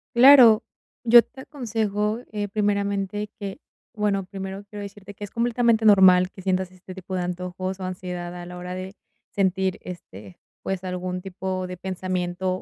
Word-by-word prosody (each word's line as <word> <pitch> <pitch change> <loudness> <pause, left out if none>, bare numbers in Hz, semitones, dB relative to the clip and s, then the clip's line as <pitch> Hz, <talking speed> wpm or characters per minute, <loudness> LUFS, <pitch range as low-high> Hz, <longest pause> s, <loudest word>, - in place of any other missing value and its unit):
Claro, 245 -3 +8 0.4
yo 235 -1 +8
te 265 - -13
aconsejo, 220 -6 -2
eh, 205 -1 -2
primeramente, 200 0 -1
que 200 -3 -6 0.3
bueno, 205 -3 0
primero 195 +1 -7
quiero 205 -1 -7
decirte 200 0 -9
que 205 +1 -7
es 205 - -12
completamente 235 -1 +2
normal 190 -3 +6
que 190 - -12
sientas 185 -1 -1
este 185 0 -12
tipo 190 0 -6
de 180 - -1
antojos, 180 +1 -4
o - - -4
ansiedad 180 -1 -5
a 175 0 -8
la 180 - -9
hora 180 0 -6
de 185 +2 -7 0.4
sentir, 190 -1 0
este, 100 - -10 0.3
pues, 190 -1 -3
algún 180 0 -3
tipo 185 0 -4
de 180 - -6
pensamiento 185 0 -3
190 Hz, 160 wpm, -24 LUFS, 185-210 Hz, 0.4 s, Claro